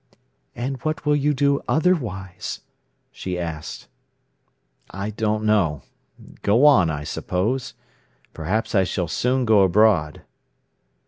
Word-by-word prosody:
"And 130 +3 -3
what 155 0 -3
will 150 0 +3
you 145 +1 +1
do 140 0 +1
otherwise?" 120 - -1 0.5
she 90 -1 -5
asked. 80 -3 -6 1.0
"I 100 +2 -5
don't 110 0 -1
know—go 100 - -1
on, 115 - +6
I 75 -2 -3
suppose. 110 - -2 0.6
Perhaps 100 +10 -2
I 95 -3 +4
shall 90 -1 -2
soon 125 +9 0
go 110 -3 +5
abroad." 95 -5 +3
105 Hz, 110 wpm, -22 LUFS, 90-130 Hz, 1.0 s, on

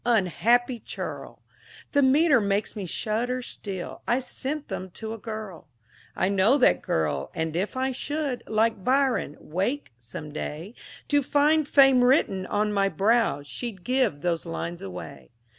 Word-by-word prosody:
Unhappy 235 +3 +2
churl! - - -7 0.5
The 285 - +3
metre 275 -1 +5
makes 200 +1 0
me 200 -4 -4
shudder 240 +7 -1
still, 190 -6 -6
I 240 - +3
sent 275 +3 -4
them 185 - -5
to 220 0 -5
a 225 - -8
girl. 215 -7 -7 0.5
I - - +1
know 200 +7 +4
that 255 - +4
girl, 75 -3 -1
and 160 0 -2
if 195 +8 -2
I 260 +1 0
should, 285 0 -2
Like 220 -2 +1
Byron, 260 - +1
wake 195 - -2
some 120 +6 -8
day 155 +6 -6 0.4
To 290 -1 +4
find 295 +2 +3
Fame 270 -3 +6
written 220 -8 +3
on 210 0 0
my 195 -1 +2
brow, 200 -3 +2
She'd 195 - -6
give 255 - +1
those 170 -1 0
lines 170 0 -5
away. 90 -2 -8
220 Hz, 150 wpm, -26 LUFS, 185-260 Hz, 0.5 s, Fame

